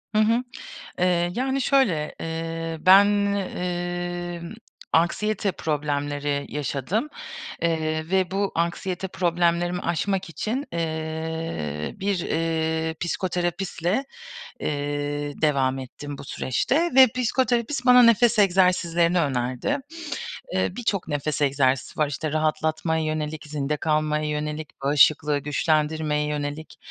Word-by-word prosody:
Hı 215 - +5
hı. 230 +3 +3 0.6
Eee, 175 -1 +2
yani, 265 +2 0
şöyle, 210 - +2
eee, 165 0 -4
ben, 190 +4 +8 0.3
emm, 175 -1 -4 0.4
anksiyete 200 +4 +1
problemleri 145 -2 -2
yaşadım, 150 - -2 0.5
eee, 155 0 -1
ve 190 -2 +2
bu 200 +1 -1
anksiyete 175 +3 -2
problemlerimi 175 0 +1
aşmak 185 +2 -1
için, 230 - -3
eee, 160 - -3
bir, 195 -1 0
eee, 160 0 -1
psikoterapistle, 180 +4 -1 0.6
eee, 145 0 -2
devam 135 -3 +2
ettim 140 +2 -8
bu - - -8
süreçte 290 - 0
ve 265 0 +9
psikoterapist 250 +1 0
bana 250 0 +8
nefes 235 0 +5
egzersizlerini 180 -3 +3
önerdi. 130 - -1 0.8
Eee, - - +2
birçok 205 -8 -1
nefes 150 0 -2
egzersizi 135 -1 +1
var, 150 - +3
işte 150 +1 -3
rahatlatmaya 155 +1 0
yönelik, 155 0 -3
zinde 150 0 -2
kalmaya 155 0 0
yönelik, 150 0 -3
bağışıklığı 145 +1 +4
güçlendirmeye 150 +1 0
yönelik. 150 +1 -4
165 Hz, 105 wpm, -24 LUFS, 150-185 Hz, 0.8 s, ve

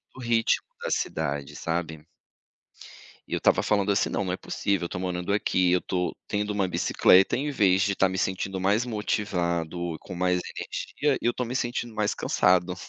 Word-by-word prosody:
o - - -11
ritmo 115 -1 +1 0.2
da - - -2
cidade, 70 -3 -2
sabe? 80 -2 -3 1.2
E - - -3
eu - - +1
estava - - +3
falando, 100 -1 +2
assim: 100 - +1
"Não, 100 - -1
não 90 - -2
é - - -1
possível. 100 -4 -1
Eu - - -8
tô 90 - -5
morando 90 +1 -2
aqui, 90 -3 +2
eu 90 - +2
tô 90 -2 -2
tendo 105 0 -2
uma 100 -2 +1
bicicleta, 95 +2 +4
em 145 +3 -2
vez 95 -7 +3
de 100 0 +2
estar 95 -1 +2
me 95 - -4
sentindo 95 0 -2
mais 105 +6 +1
motivado 85 -6 -2
e - - -16
com 95 - -9
mais 90 0 +1 0.2
energia, 145 -2 -2
eu 120 0 +1
tô 125 - -2
me 125 +2 -5
sentindo 120 -2 -2
mais 105 -1 0
cansado". 90 0 +2
95 Hz, 190 wpm, -26 LUFS, 90-105 Hz, 1.2 s, bicicleta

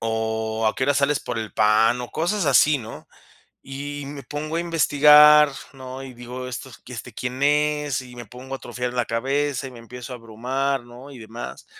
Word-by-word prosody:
O: 110 0 -1
"¿A 110 - +2
qué 130 - -1
horas 145 0 +2
sales 140 +1 +1
por 120 - -4
el 110 -1 -5
pan?", 110 +3 +3
o 120 - -6
cosas 175 +2 -1
así, 145 +2 +5
¿no? 110 -2 -10 0.5
Y 145 +1 -6
me 140 0 -8
pongo 150 +5 -5
a - - +1
investigar, 150 -2 +6 0.2
¿no? 130 -1 -8
Y 130 -1 -9
digo: 125 +1 -7
"Estos, 130 -1 -8
este, 125 -1 -8
¿quién 125 +3 -4
es?". 150 -1 +1
Y 125 -1 -13
me 120 -2 -8
pongo 130 +4 -9
a - - -5
atrofiar 125 0 -4
la 120 -1 +1
cabeza 135 +3 -1
y 130 - -8
me 120 - -12
empiezo 125 +2 -9
a - - -5
abrumar, 125 +4 -2
¿no?, 125 +4 -12
y 135 - -11
demás. 110 - -9
130 Hz, 200 wpm, -23 LUFS, 120-145 Hz, 0.5 s, investigar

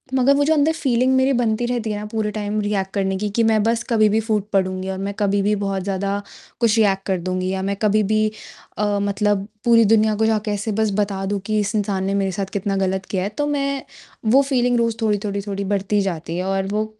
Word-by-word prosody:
मगर 265 +2 +4
वो 285 - +3
जो 315 - +3
अंदर 305 +1 +3
फ़ीलिंग 260 -4 +1
मेरी 260 +1 +3
बनती 240 -1 +1
रहती 240 -2 -2
है 205 - -3
ना 210 - -6
पूरे 220 -2 -1
टाइम 210 0 -2
रिएक्ट 200 -2 -1
करने 190 -1 0
की 210 +1 -2
कि 230 - +4
मैं 220 -1 +3
बस 230 +1 +1
कभी 215 -2 +4
भी 215 +2 +2
फ़ूट 215 -2 -1
पड़ूँगी 185 0 0
और 190 - -3
मैं 200 +1 -3
कभी 200 -1 +2
भी 210 +2 +2
बहुत 195 -1 -2
ज़्यादा 200 +1 -2 0.4
कुछ 230 -2 +3
रिएक्ट 195 -3 +2
कर 190 -2 +1
दूँगी 185 +1 -2
या 190 0 -2
मैं 200 +1 -1
कभी 215 0 +3
भी 215 +1 +2 0.5
अ, 205 -1 0
मतलब 200 0 0 0.2
पूरी 230 -1 +6
दुनिया 215 0 +3
को 220 +1 +1
जाके 215 -1 0
ऐसे 205 +2 -2
बस 215 - +1
बता 195 -1 -1
दूँ 200 +1 -1
कि 215 0 0
इस 205 +2 -1
इंसान 200 -2 -1
ने 195 - -1
मेरे 195 -1 0
साथ 195 +1 -2
कितना 195 0 -1
गलत 190 0 -1
किया 185 -2 0
है। 200 - -2
तो 290 - +1
मैं 275 -2 -1 0.5
वो 270 - +6
फ़ीलिंग 250 -3 +1
रोज़ 230 -1 0
थोड़ी-थोड़ी-थोड़ी 200 -2 -1
बढ़ती 200 +1 0
जाती 170 -3 -3
है 180 - -2
और 195 0 -1
वो 215 +1 0
205 Hz, 235 wpm, -21 LUFS, 195-225 Hz, 0.5 s, पूरी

